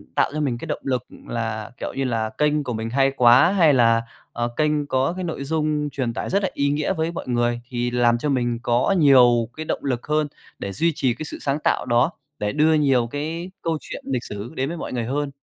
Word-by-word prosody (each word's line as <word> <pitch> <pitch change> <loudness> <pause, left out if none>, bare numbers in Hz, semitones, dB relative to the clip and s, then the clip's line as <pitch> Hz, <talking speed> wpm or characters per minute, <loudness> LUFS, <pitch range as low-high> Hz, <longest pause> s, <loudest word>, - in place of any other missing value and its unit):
tạo - - +3
cho 155 - -2
mình 130 -5 0
cái - - -7
động - - -3
lực 130 -3 -1 0.2
là 110 -2 -3
kiểu - - -4
như 135 - -2
là 115 -4 -1
kênh 150 0 +2
của 125 -3 -3
mình 110 0 -3
hay 135 +1 +3
quá, 125 +5 +6
hay 165 -7 +5
là, 115 -3 +4 0.3
ờ, 120 0 -1
kênh 150 -1 +1
có 130 +3 +1
cái 185 0 -5
nội 160 -5 -4
dung 150 0 -1
truyền 130 -4 -2
tải - - -4
rất 200 +1 +1
là 190 - +1
ý 140 0 +1
nghĩa 150 +5 0
với 160 -1 -1
mọi 170 - -6
người, 120 -1 0
thì 120 -1 -2
làm 120 -1 +3
cho 145 +5 -2
mình 120 -3 0
có 120 +11 +2
nhiều 125 -6 +5
cái 155 - -4
động - - -3
lực 125 -3 -2
hơn 150 0 +1 0.3
để 100 - -4
duy 165 +7 +1
trì 130 -4 +1
cái 155 - -6
sự - - -6
sáng 140 +1 0
tạo - - +1
đó, 120 +6 +2 0.3
để 105 0 -1
đưa 155 +2 +4
nhiều 135 -6 +3
cái 160 +7 -4
câu 165 -1 -1
chuyện - - -8
lịch 130 -3 -1
sử 105 +3 -6
đến 135 0 -1
với 170 - -5
mọi - - -5
người 120 -2 -2
hơn. 140 +3 -2
135 Hz, 245 wpm, -23 LUFS, 120-150 Hz, 0.3 s, quá